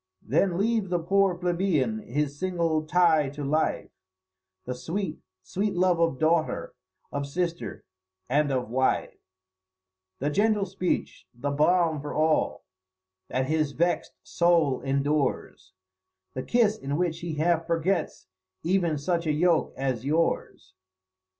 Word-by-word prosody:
Then 170 - +1
leave 215 -1 +1
the 180 - +1
poor 190 +2 +2
plebeian 170 - 0
his 145 +5 -3
single 165 -4 0
tie 160 -4 +4
to 145 +1 -7
life 155 +3 0 0.7
The 125 - -3
sweet, 165 +5 -4 0.2
sweet 200 +1 -2
love 180 -1 +2
of 165 -5 +2
daughter, 160 +1 +1 0.4
of 140 0 -3
sister, 170 +3 -3 0.4
and 145 +2 +2
of 130 -3 -1
wife, 130 +3 0 1.0
The 145 +3 -1
gentle 205 +3 +2
speech, 185 -1 -3
the 140 +4 -3
balm 160 +1 +2
for 145 - -6
all 155 0 +1 0.6
that 130 +1 -1
his 155 0 0
vext 170 +4 0
soul 170 -6 +2
endures, 140 +1 -1 0.6
The 130 - -3
kiss 220 - +2
in 140 +2 -3
which 170 -2 -1
he 170 -2 -4
half 165 +1 +1
forgets 170 +3 -1 0.4
even 170 -2 +1
such 170 +3 -1
a - - +3
yoke 165 +2 +2
as 130 -3 -2
yours. 160 +4 -1
160 Hz, 130 wpm, -27 LUFS, 145-180 Hz, 1.0 s, tie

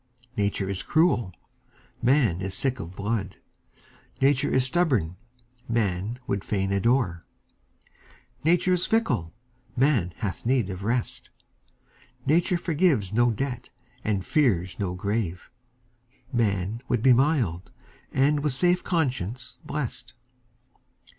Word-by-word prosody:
Nature 100 -1 0
is 95 -1 0
cruel, 155 - +2 0.7
man 120 - +3
is 95 -1 -2
sick 135 -2 +1
of 85 +3 -7
blood; 100 -1 -2 0.8
Nature 140 +1 +3
is 130 -1 +2
stubborn, 130 - +1 0.5
man 105 -1 -1
would 100 -4 -2
fain 95 -2 -1
adore; 100 -3 +1 1.2
Nature 175 +3 +3
is 180 0 +1
fickle, 125 - +1 0.5
man 125 - +2
hath 105 -5 -4
need 120 -5 +1
of 95 +1 -7
rest; 120 +2 -2 1.0
Nature 170 +5 +3
forgives 155 - +1
no 120 +2 +4
debt, 125 +1 -3 0.3
and 100 -3 -1
fears 95 - +1
no 95 -3 -2
grave; 100 -2 -3 0.8
Man 105 -1 0
would 120 -2 0
be 130 -1 +7
mild, 120 - +1 0.4
and 145 +3 +3
with 145 -2 0
safe 180 +6 +2
conscience 130 - -2
blest. 140 -5 -5
120 Hz, 115 wpm, -26 LUFS, 95-140 Hz, 1.2 s, be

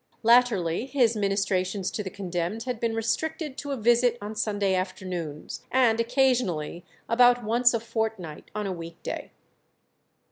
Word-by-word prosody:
Latterly 230 -4 +3
his 245 -5 +2
ministrations 195 -2 0
to - - -3
the 195 - -5
condemned 180 +3 -3
had 250 -2 -4
been 230 -1 -1
restricted 290 +6 -2
to 285 - -6
a 275 - -2
visit 240 +1 +3
on 205 +1 -6
Sunday 205 -3 0
afternoons, 185 -5 -4
and 240 -3 +3
occasionally 230 - +1 0.2
about 245 +1 +5
once 240 +3 +4
a - - +1
fortnight 220 -8 -4
on 210 -1 -2
a 195 - -2
week 165 -1 -9
day. - - -5
220 Hz, 145 wpm, -26 LUFS, 185-240 Hz, 0.2 s, about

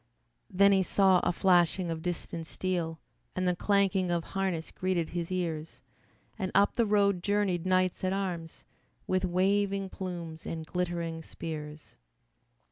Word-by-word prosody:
Then 200 +1 +5
he 195 -1 +4
saw 190 0 +4
a 175 - +1
flashing 175 -1 +3
of 160 -1 -4
distant 170 -1 -4
steel 170 -4 -2 0.4
And 185 0 0
the 180 - +2
clanking 195 -1 +2
of 170 -1 0
harness 190 -4 -2
greeted 185 -3 -1
his 170 0 -4
ears, 165 -4 -3 0.6
And 190 -2 -2
up 200 +1 +5
the 235 -2 +1
road 200 -3 +3
journeyed 195 -3 0
knights 185 0 +2
at 185 - +1
arms, 180 -4 -4 0.4
With 185 0 +1
waving 195 +1 +1
plumes 170 -4 -6
and 160 -1 -4
glittering 170 -1 -2
spears. 150 -2 -8
180 Hz, 140 wpm, -30 LUFS, 170-195 Hz, 0.6 s, Then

